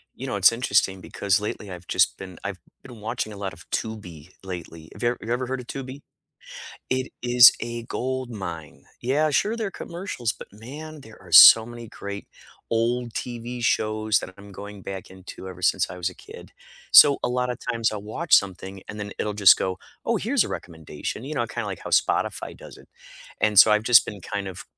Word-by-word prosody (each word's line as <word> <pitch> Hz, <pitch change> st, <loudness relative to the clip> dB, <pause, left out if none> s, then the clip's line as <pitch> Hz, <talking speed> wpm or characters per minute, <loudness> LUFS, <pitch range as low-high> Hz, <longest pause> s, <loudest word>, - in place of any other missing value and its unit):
You 135 Hz, -, -7 dB
know, 130 Hz, -, -3 dB
it's 100 Hz, 0 st, +6 dB
interesting 100 Hz, -5 st, +1 dB
because 100 Hz, +1 st, 0 dB
lately 105 Hz, -1 st, -6 dB
I've 90 Hz, -1 st, -10 dB
just -, -, +2 dB
been 95 Hz, -2 st, -10 dB
I've 100 Hz, -2 st, -5 dB, 0.2 s
been 125 Hz, -4 st, -12 dB
watching 110 Hz, 0 st, -4 dB
a 105 Hz, -, -9 dB
lot 100 Hz, -2 st, -5 dB
of 85 Hz, +4 st, -16 dB
Tubi 90 Hz, -8 st, -5 dB
lately. 85 Hz, -4 st, -8 dB
Have -, -, -10 dB
you 120 Hz, -, +3 dB
have 120 Hz, -, -3 dB
you 115 Hz, -, -2 dB
ever 125 Hz, 0 st, -2 dB
heard 130 Hz, 0 st, -3 dB
of 120 Hz, -, -15 dB
Tubi? 135 Hz, +1 st, -7 dB, 0.9 s
It 130 Hz, 0 st, -2 dB
is 120 Hz, 0 st, +8 dB
a 120 Hz, 0 st, -5 dB
gold 130 Hz, +1 st, -4 dB
mine. 85 Hz, -8 st, -8 dB, 0.2 s
Yeah, 145 Hz, +5 st, +1 dB
sure, 210 Hz, +10 st, +1 dB
there 225 Hz, -2 st, -2 dB
are -, -, -10 dB
commercials, 170 Hz, -, -4 dB
but -, -, -12 dB
man, 145 Hz, +9 st, -10 dB
there 110 Hz, -2 st, -15 dB
are 90 Hz, -2 st, -16 dB
so 110 Hz, +7 st, +10 dB
many 120 Hz, -1 st, -10 dB
great 100 Hz, -1 st, -8 dB, 0.4 s
old 120 Hz, +1 st, 0 dB
TV 120 Hz, +1 st, -6 dB
shows 110 Hz, -1 st, +1 dB
that 95 Hz, -, -8 dB
I'm 100 Hz, 0 st, -13 dB
going 100 Hz, +1 st, -9 dB
back 95 Hz, -1 st, -7 dB
into 95 Hz, 0 st, -11 dB
ever 90 Hz, -1 st, -10 dB
since -, -, +1 dB
I 90 Hz, -, -8 dB
was 90 Hz, 0 st, -1 dB
a 90 Hz, -, -11 dB
kid. -, -, -13 dB, 0.4 s
So, 140 Hz, -1 st, +9 dB
a -, -, 0 dB
lot 125 Hz, 0 st, -1 dB
of 125 Hz, -, -4 dB
times 115 Hz, -2 st, -1 dB
I'll 105 Hz, -, -5 dB
watch 130 Hz, +11 st, +1 dB
something 95 Hz, 0 st, 0 dB
and 105 Hz, -, -7 dB
then 100 Hz, -1 st, -6 dB
it'll 105 Hz, -1 st, -2 dB
just 100 Hz, -3 st, +7 dB
go, 95 Hz, -1 st, -2 dB, 0.3 s
"Oh, -, -, +1 dB
here's -, -, +1 dB
a -, -, -6 dB
recommendation," 80 Hz, -, -7 dB
you 150 Hz, +3 st, -5 dB
know, 120 Hz, -4 st, -1 dB
kinda 120 Hz, 0 st, -5 dB
like 95 Hz, -3 st, -6 dB
how -, -, -6 dB
Spotify -, -, 0 dB
does -, -, -13 dB
it, -, -, -19 dB, 0.5 s
and 105 Hz, -2 st, +3 dB
so, 110 Hz, -, +9 dB
I've 105 Hz, 0 st, +2 dB
just 115 Hz, 0 st, +6 dB
been 105 Hz, -2 st, -7 dB
kind 100 Hz, +1 st, -4 dB
of 95 Hz, -, -9 dB
110 Hz, 215 wpm, -24 LUFS, 95-125 Hz, 0.9 s, so